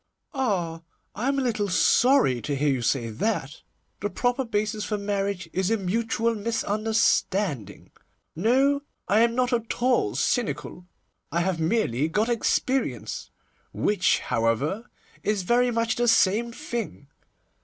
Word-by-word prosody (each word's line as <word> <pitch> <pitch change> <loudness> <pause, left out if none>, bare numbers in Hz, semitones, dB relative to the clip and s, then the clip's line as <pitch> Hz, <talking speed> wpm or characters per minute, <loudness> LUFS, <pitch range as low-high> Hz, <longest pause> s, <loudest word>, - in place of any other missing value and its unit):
'Ah! 185 - -1 0.3
I 235 +5 -3
am 275 0 +1
a 270 - +1
little 215 -5 0
sorry 185 - +4
to 145 - -2
hear 145 +2 +1
you 130 -2 -1
say 115 -1 0
that. 145 - -2 0.4
The 205 - -2
proper 245 +4 0
basis 215 -2 -2
for 210 - -2
marriage 200 -3 -2
is 190 +1 0
a 225 - +2
mutual 225 +4 0
misunderstanding. 205 - 0 0.4
No, 265 - +2 0.3
I 205 +3 +3
am 230 0 +3
not 255 0 +1
at 230 -1 -2
all 250 0 +2
cynical, 205 -6 -2 0.4
I 170 - +1
have 180 -1 -1
merely 160 - +1
got 210 +8 0
experience, 255 +3 -1 0.4
which, 205 -3 +2
however, 125 - -1 0.3
is 210 -3 0
very 245 +5 +3
much 230 -1 0
the 240 0 +1
same 225 +1 +3
thing. 235 - -5
210 Hz, 135 wpm, -25 LUFS, 175-235 Hz, 0.4 s, sorry